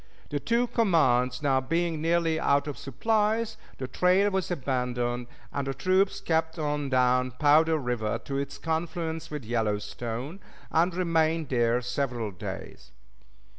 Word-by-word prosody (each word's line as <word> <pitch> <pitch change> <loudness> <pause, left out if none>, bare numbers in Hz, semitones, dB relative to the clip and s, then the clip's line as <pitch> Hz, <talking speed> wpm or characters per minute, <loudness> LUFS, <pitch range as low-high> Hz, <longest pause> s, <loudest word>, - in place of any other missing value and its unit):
The 145 - 0
two 235 - +1
commands 150 - +2
now 135 -2 +3
being 165 +3 -1
nearly 165 -1 +2
out 140 -2 +2
of 145 -2 -4
supplies, 220 - 0 0.2
the 130 - -4
trail 185 +8 +3
was 190 -1 -1
abandoned, 125 -5 -1 0.3
and 140 -1 -2
the 135 - -2
troops 190 +2 +2
kept 160 -2 0
on 145 -2 -1
down 125 0 +3
Powder 155 +2 +5
River 120 -6 -1
to 140 - -4
its 140 0 -4
confluence 165 0 -3
with 150 -3 -5
the 110 - -12
Yellowstone, 120 - -2 0.3
and 170 +2 +2
remained 165 -3 +1
there 120 -1 +2
several 125 -3 -2
days. 90 - -8
150 Hz, 140 wpm, -27 LUFS, 125-170 Hz, 0.3 s, Powder